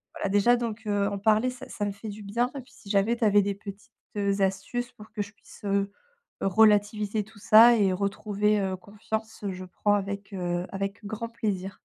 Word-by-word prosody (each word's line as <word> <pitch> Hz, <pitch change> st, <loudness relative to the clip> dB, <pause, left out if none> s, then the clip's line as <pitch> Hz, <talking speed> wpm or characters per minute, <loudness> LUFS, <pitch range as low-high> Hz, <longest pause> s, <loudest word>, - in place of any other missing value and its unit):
voilà 195 Hz, -, -2 dB
déjà 205 Hz, +5 st, +4 dB
donc 230 Hz, -2 st, -4 dB
heu, 200 Hz, -1 st, +1 dB
en 200 Hz, -, -4 dB
parler 220 Hz, +4 st, +3 dB
ça 250 Hz, -, -11 dB
ça 205 Hz, -, -3 dB
me 205 Hz, -, -1 dB
fait 210 Hz, +2 st, -8 dB
du 205 Hz, +1 st, -8 dB
bien 235 Hz, +5 st, 0 dB
et 275 Hz, -, -4 dB
puis 250 Hz, -, -21 dB
si 200 Hz, -, -15 dB
jamais 205 Hz, +3 st, +2 dB
tu 230 Hz, -, -3 dB
avais 205 Hz, -1 st, +5 dB
des 200 Hz, 0 st, -1 dB
petites, 200 Hz, +3 st, -10 dB, 0.3 s
heu, 200 Hz, 0 st, 0 dB
astuces 195 Hz, +6 st, -1 dB
pour 215 Hz, -2 st, -14 dB
que 210 Hz, -, -2 dB
je 200 Hz, -, -13 dB
puisse, 225 Hz, -, -17 dB
heu, 200 Hz, 0 st, 0 dB, 0.5 s
relativiser 210 Hz, +1 st, +3 dB
tout 215 Hz, +1 st, -18 dB
ça 225 Hz, +4 st, +8 dB
et 195 Hz, -3 st, +3 dB
retrouver, 205 Hz, +2 st, 0 dB
heu, 190 Hz, -1 st, -1 dB
confiance, 215 Hz, +2 st, -6 dB
je 185 Hz, 0 st, -7 dB
prends 205 Hz, +3 st, 0 dB
avec, 200 Hz, +1 st, -4 dB
heu, 175 Hz, -1 st, -2 dB
avec 195 Hz, +2 st, -4 dB
grand 225 Hz, +3 st, -4 dB
plaisir. 200 Hz, -4 st, -3 dB
205 Hz, 205 wpm, -27 LUFS, 195-220 Hz, 0.5 s, ça